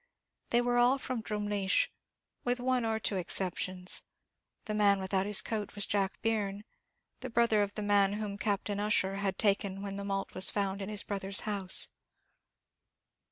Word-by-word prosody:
They 240 - +4
were 245 0 +2
all 245 +3 +5
from 255 -3 -4
Drumleesh, 210 - 0 0.5
with 245 0 +1
one 255 0 +1
or 220 -1 0
two 200 -1 0
exceptions; 185 0 0 0.6
the 215 - -2
man 205 -2 +4
without 190 0 0
the 210 0 +4
coat 215 -2 -3
was 205 - 0
Jack 195 -1 -1
Byrne, 210 -3 -1 0.6
the 255 - -6
brother 230 -2 +3
of 205 0 -2
the 210 - -2
man 200 -1 +3
whom 205 -1 -4
Captain 205 0 -1
Ussher 195 -2 +1
had 195 -1 -1
taken 200 -1 +1
when 200 -1 -4
the 200 - -4
malt 195 0 -3
was 185 0 +3
found 200 -1 -1
in 195 - -4
his 210 -1 +1
brother 195 -2 -4
in 195 - -6
law's - - +4
house. 200 -3 0
205 Hz, 175 wpm, -31 LUFS, 195-220 Hz, 0.6 s, all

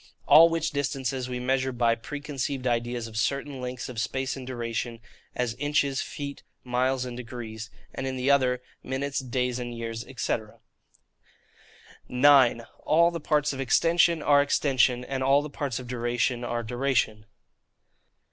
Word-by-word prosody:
All 160 +4 +9
which 165 -1 -1
distances 135 -2 -2
we 125 0 -3
measure 130 +1 0
by 120 -2 +2
preconceived 140 +1 -4
ideas 120 -1 -1
of 110 -1 -8
certain 140 +3 -1
lengths 125 0 -5
of 125 -3 -6
space 130 +4 -2
and 130 -2 -8
duration,—as 120 0 -4
inches, 145 -1 +1
feet, 140 -1 -6 0.2
miles, 125 +1 0
and 125 -1 -6
degrees, 115 -2 -7 0.2
and 135 - -4
in 130 0 -3
the 130 +2 +2
other, 125 -2 +2 0.2
minutes, 135 +2 -2
days, 125 -1 -1
and 120 -1 -5
years, 115 0 -4 0.2
&c. - - +1 1.7
9. 130 -2 +5 0.2
All 170 +2 +3
the 170 - -4
Parts 150 -1 +1
of 135 - -7
Extension 165 +5 +3
are 145 -1 +5
Extension, 130 -3 +2
and 135 0 -3
all 135 +2 +4
the 150 - -7
Parts 140 -5 -3
of 125 - -6
Duration 120 0 -1
are 120 -1 -2
Duration. 120 -3 -1
130 Hz, 145 wpm, -27 LUFS, 120-140 Hz, 1.7 s, All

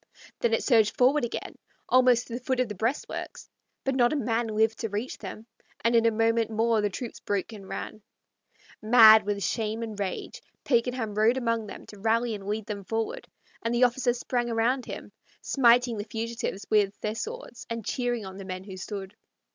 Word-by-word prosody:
Then 235 - +1
it - - -2
surged 220 -5 +3
forward 260 +3 +4
again, 240 - -5 0.3
almost 250 -1 +4
to 235 - -9
the 240 - -3
foot 260 0 -1
of 255 - +2
the 210 - -5
breastworks; 225 +8 -3 0.4
but 270 - 0
not 240 -2 +3
a - - 0
man 230 -3 0
lived 220 0 +1
to 225 - -2
reach 210 +6 -4
them, 220 - -8 0.4
and 235 +1 +4
in 230 0 +5
a - - +4
moment 225 0 +2
more 225 0 +2
the 205 - +1
troops 230 +4 -6
broke 205 +2 -2
and 195 -3 -11
ran - - -4
back. - - -26 0.8
Mad 220 -1 +8
with 200 -1 -1
shame 220 +4 -1
and 215 -2 -6
rage, 195 -2 -4 0.2
Pakenham 240 -3 0
rode 220 +4 +3
among 230 -3 -1
them - - -9
to 205 - -13
rally 225 +2 +1
and 200 -2 -7
lead 210 0 -2
them 205 -2 -5
forward, 225 +3 -3 0.3
and 230 +1 -1
the 240 - +3
officers 245 0 +2
sprang 240 -1 -1
around 235 +3 +1
him, - - -7 0.3
smiting 245 -2 +3
the - - -2
fugitives 225 -2 -4
with 205 -2 +2
their 215 - -1
swords 455 - -7
and 230 -2 -4
cheering 245 -4 -1
on 190 0 -8
the 195 - -7
men 185 0 -5
who 190 -1 -9
stood. 195 +1 -6
225 Hz, 200 wpm, -27 LUFS, 210-240 Hz, 0.8 s, Mad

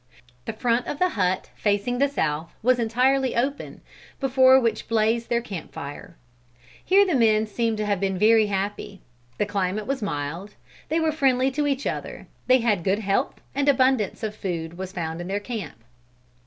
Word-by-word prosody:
The 225 - -4
front 235 +2 0
of 295 - -3
the 365 +3 +2
hut, 185 - -1
facing 210 +4 0
the 280 - +4
south, 160 - -2
was 250 +1 +3
entirely 255 +3 +1
open, 275 +4 -2 0.4
before 260 -1 +5
which 230 -3 -1
blazed 230 +1 +1
their 235 0 +1
camp 195 -8 -7
fire. 155 +6 -8 0.7
Here 395 +2 +5
the 365 - 0
men 220 -4 +3
seem 225 +1 -1
to 210 - -2
have 205 -2 0
been 195 -1 -1
very 220 +2 +5
happy. 200 0 -4 0.4
The 210 - +1
climate 200 +1 -2
was 275 -1 -2
mild; 170 +2 -4 0.3
they 320 - +1
were 320 -1 +1
friendly 270 -3 +2
to 290 +2 -1
each 280 0 -1
other; - - -4 0.2
they 255 0 +5
had 210 -7 +1
good 195 +2 +1
health 210 +5 -1
and 280 +1 +1
abundance 255 -6 +2
of 215 -1 -2
food 170 -5 -4
was 185 +1 -6
found 165 -2 -4
in 175 - -6
their 200 +2 -1
camp. 200 - -7
220 Hz, 180 wpm, -24 LUFS, 195-260 Hz, 0.7 s, before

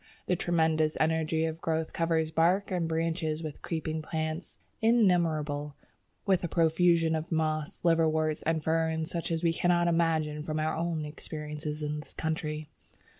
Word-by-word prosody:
The 180 - +1
tremendous 160 -3 +1
energy 160 0 +1
of 160 0 -4
growth 160 -1 -1
covers 165 -1 +1
bark 180 +5 +2
and 175 -3 0
branches 160 -1 -1
with 155 -2 -6
creeping 160 -1 -3
plants 160 +2 -4 0.2
innumerable, 165 -10 +2 0.5
with 190 -3 +2
a - - 0
profusion 165 0 +3
of 160 +2 -3
moss, 155 -1 -1
liverworts, 160 -2 +2
and 160 -1 0
ferns 160 +1 0
such 170 -1 -3
as 165 0 -1
we 165 -1 +3
cannot 175 0 +2
imagine 160 -3 +1
from 155 0 -3
our 155 +1 0
own 165 -2 -2
experiences 150 0 -6
in 150 0 -2
this 150 - -11
country. 155 -1 -3
160 Hz, 150 wpm, -29 LUFS, 155-165 Hz, 0.5 s, profusion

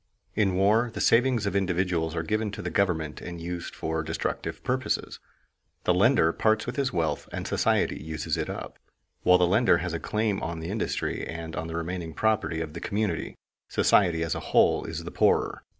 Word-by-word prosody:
In 100 -4 +2
war 105 +5 +3
the - - -6
savings 120 -2 +3
of 100 - -1
individuals 90 -3 0
are 80 - -1
given 110 +4 -1
to - - -6
the - - -3
government 80 -6 0
and 85 -1 -7
used 85 +1 -5
for 80 0 -2
destructive 80 +1 -3
purposes. 130 +1 -1 0.6
The 90 - +3
lender 95 -3 +4
parts 110 0 +2
with 125 - -4
his 140 -2 0
wealth 85 -4 -1
and - - -4
society - - +1
uses 80 0 -3
it - - -3
up. - - -7 0.4
While 90 0 +6
the 90 - +4
lender 105 +7 +4
has 90 -1 -3
a 85 - -2
claim 105 0 -1
on 85 0 -4
the 80 +3 -5
industry 110 - -2
and 80 -1 -6
on 85 -2 -3
the 80 - -5
remaining 85 -1 -4
property 105 -7 +1
of 80 -2 -5
the 85 - -7
community, 100 -5 -2 0.3
society 85 -5 +3
as 85 - -1
a - - -3
whole - - +3
is - - -5
the - - -7
poorer. - - +2
90 Hz, 195 wpm, -27 LUFS, 80-105 Hz, 0.6 s, While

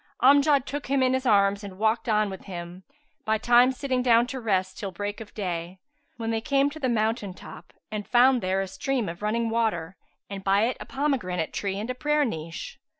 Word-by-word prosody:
Amjad 280 0 +5
took 285 +2 -5
him 270 0 +2
in 255 0 +2
his 260 0 -1
arms 200 -1 +3
and 195 -2 -8
walked 220 +3 +1
on 210 -2 +2
with 190 - -9
him, 175 -1 -7 0.5
bytimes 240 +4 +4
sitting 260 -2 -1
down 240 -1 +4
to 260 +1 -5
rest 190 -5 -1
till 200 - -3
break 205 +4 -5
of 215 - -10
day, 180 -3 -4 0.4
when 225 -1 -3
they 225 0 -1
came 275 +3 +2
to 315 - -9
the 260 -4 0
mountain 220 -4 -1
top - - -12 0.2
and 210 -1 -4
found 250 0 +5
there 190 +1 0
a 195 - -3
stream 250 +3 -2
of 170 +3 -7
running 225 +2 0
water 205 -7 -1 0.3
and 195 -1 -7
by 195 +2 +3
it 245 +2 0
a - - -8
pomegranate 245 - -1
tree 195 -1 -2
and 220 +5 -3
a - - -3
prayer 295 +3 +1
niche. 165 - -6
220 Hz, 210 wpm, -26 LUFS, 195-255 Hz, 0.5 s, Amjad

